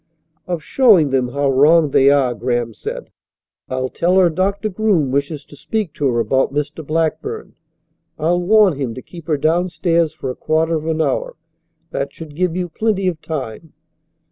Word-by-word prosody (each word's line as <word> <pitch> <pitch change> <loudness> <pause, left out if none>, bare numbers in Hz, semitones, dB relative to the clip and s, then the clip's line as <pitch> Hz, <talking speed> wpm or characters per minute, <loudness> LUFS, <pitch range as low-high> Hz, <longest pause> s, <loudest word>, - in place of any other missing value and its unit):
"Of 175 -4 -3
showing 200 - +4
them 130 -2 +1
how 140 +2 0
wrong 150 +3 +4
they 135 +1 +5
are," 135 -3 +3
Graham 120 -1 -2
said. - - -7 0.6
"I'll 130 0 -1
tell 175 +7 +1
her 180 -3 +5
Doctor 195 +5 -1
Groom 190 -9 +1
wishes 140 +1 -2
to - - -15
speak 210 +1 -3
to 145 - -1
her 120 -2 +1
about 130 +5 +1
Mr. 150 +2 -3
Blackburn. 165 - -2 0.6
I'll 170 +3 +1
warn 200 -3 +4
him 120 -4 -3
to 130 - -8
keep 170 -2 -12
her 155 -3 +1
downstairs 170 +1 +1
for 135 -4 -5
a - - -8
quarter 160 +1 0
of 160 0 -2
an 160 0 0
hour. - - -2 0.6
That - - -3
should 155 -3 -10
give 180 0 0
you 180 -1 -2
plenty 195 +2 -1
of 165 -3 -2
time." 150 -1 -6
160 Hz, 175 wpm, -19 LUFS, 140-180 Hz, 0.6 s, they